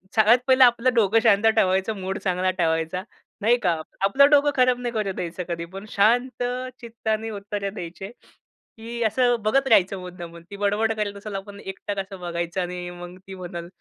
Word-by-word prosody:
सगळ्यात 220 +2 +6
पहिलं 260 0 +6
आपलं 245 +1 +4
डोकं 225 -2 +4
शांत 215 -1 +4
ठेवायचं 190 +1 +2
मूड 190 +2 -3
चांगला 185 -1 0
ठेवायचा 165 0 -1 0.4
नाही 235 +3 +4
का. 175 - +3 0.3
आपलं 280 +8 +5
डोकं 290 0 +5
खराब 255 -1 +3
नाही 245 -1 -3
करुन 205 -4 -2
द्यायचं 180 +1 -4
कधी 170 0 -3
पण, 195 +2 -7
शांत 245 +5 +2 0.4
चित्ताने 225 -1 -3
उत्तरं 200 -1 -4
द्यायचे. 185 +1 -7 0.7
की 235 +1 -7
असं 245 +2 +2
बघत 270 +6 +2
राहायचं 195 -4 +4
मुद्दामून 170 -2 -9
ती 200 - -6
बडबड 205 +2 +1
करेल 210 -2 -3
असेल 205 0 -7
आपण 200 +1 -7
एकटक 195 +1 -5
असं 195 -1 -6
बघायचं 170 +1 -3
आणि 180 0 -5
मग 175 +1 -10
ती 195 - -8
म्हणलं, 175 -2 -7
200 Hz, 175 wpm, -24 LUFS, 180-225 Hz, 0.7 s, सगळ्यात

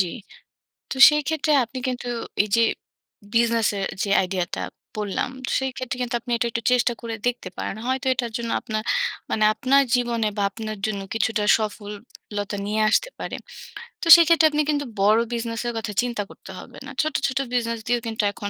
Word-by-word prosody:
জ্বি। 185 - +2 0.8
তো - - -2
সেই 300 0 +1
ক্ষেত্রে 315 -1 0
আপনি 255 +2 -7
কিন্তু 245 -1 -3 0.4
এই 210 - -6
যে 230 - +4 0.7
বিজনেস 230 -1 +3
এর 195 - -1 0.2
যে 200 - -2
আইডিয়াটা 180 -2 -3 0.4
বললাম, 210 +3 -2 0.3
সেই 265 0 -1
ক্ষেত্রে 255 -1 -4
কিন্তু 245 0 -2
আপনি 245 - -7
এটা 235 - 0
একটু 230 0 -3
চেষ্টা 245 -1 +3
করে 230 -1 -4
দেখতে 245 -6 -2
পারেন। - - -3
হয়তো 260 +1 -1
এটার 240 -3 -3
জন্য 230 -1 -4
আপনার, 215 -1 -3 0.5
মানে 215 - +1
আপনার 275 +3 +3
জীবনে 235 -3 0
বা 200 - +1
আপনার 215 0 -6
জন্য 200 -2 -3
কিছুটা 220 -1 0 0.2
সফল 210 -1 -4 0.5
লতা 205 0 -3
নিয়ে 215 +1 0
আসতে - - +2
পারে। - - -4 0.7
তো - - -3
সেক্ষেত্রে 335 -1 +5
আপনি 300 0 +1
কিন্তু 285 -1 0 0.2
বড় 210 +3 +5
বিজনেসের 235 0 -3
কথা 220 -1 -3
চিন্তা 240 -4 -2
করতে - - -13
হবে - - -12
না। - - -8
ছোট, 310 -1 -2
ছোট, 265 - -3 0.2
বিজনেস 230 -2 0
দিয়েও 240 0 +1
কিন্তু 220 -1 -2
এখন 205 0 -6
230 Hz, 180 wpm, -23 LUFS, 215-255 Hz, 0.8 s, সেক্ষেত্রে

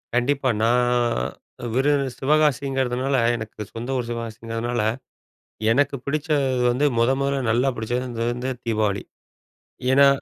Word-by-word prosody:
கண்டிப்பா. 130 +2 +1
நான் 120 +2 +3 0.9
விருது 140 +2 +2
சிவகாசிங்கிறதுனால, 135 -2 +1 0.2
எனக்கு 110 -1 -7
சொந்த 120 +3 -6
ஊரு 125 - -2
சிவகாசிங்கிறதுனால, 115 0 -3 0.9
எனக்கு 145 +4 +2
பிடிச்சது 140 -3 0
வந்து 130 +5 +1
மொத 115 +2 +4
மொதல்ல 140 0 0
நல்லா 125 +4 +2
பிடிச்சது 120 +1 -3
வந்து 125 +2 -3
தீபாவளி. 105 -3 0 0.9
ஏன்னா, 140 +1 +7
125 Hz, 105 wpm, -23 LUFS, 115-140 Hz, 0.9 s, ஏன்னா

